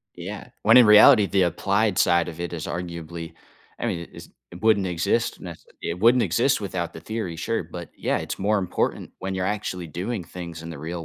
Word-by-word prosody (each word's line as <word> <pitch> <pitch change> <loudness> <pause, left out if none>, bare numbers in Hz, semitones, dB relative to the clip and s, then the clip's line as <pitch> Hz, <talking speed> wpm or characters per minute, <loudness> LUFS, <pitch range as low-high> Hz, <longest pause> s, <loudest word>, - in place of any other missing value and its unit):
Yeah. - - -8
When - - +6
in 125 -2 +9
reality, 105 +1 +8
the 95 -1 +2
applied 100 +3 +1
side 85 0 +3
of 85 0 -8
it 85 0 -4
is 80 -2 -5
arguably 85 -1 -6 0.4
I - - -3
mean, 85 -1 -3
it's - - -11 0.2
it 90 - -12
wouldn't 110 -3 +3
exist 85 -2 -1
nece - - -9 0.2
it 85 - -3
wouldn't 120 +3 +5
exist 115 +8 +2
without 90 -4 -4
the - - -8
theory, 110 -7 -4
sure, 115 +6 -2
but, 85 +1 -9
yeah, - - -1
it's - - -4
more 105 +2 +1
important 95 -2 -2
when 95 0 -4
you're 95 - -2
actually 95 -4 -3
doing 90 +5 -4
things 85 -2 -8
in 85 - -7
the 75 - -8
real 85 +2 -5
90 Hz, 205 wpm, -24 LUFS, 85-105 Hz, 0.4 s, in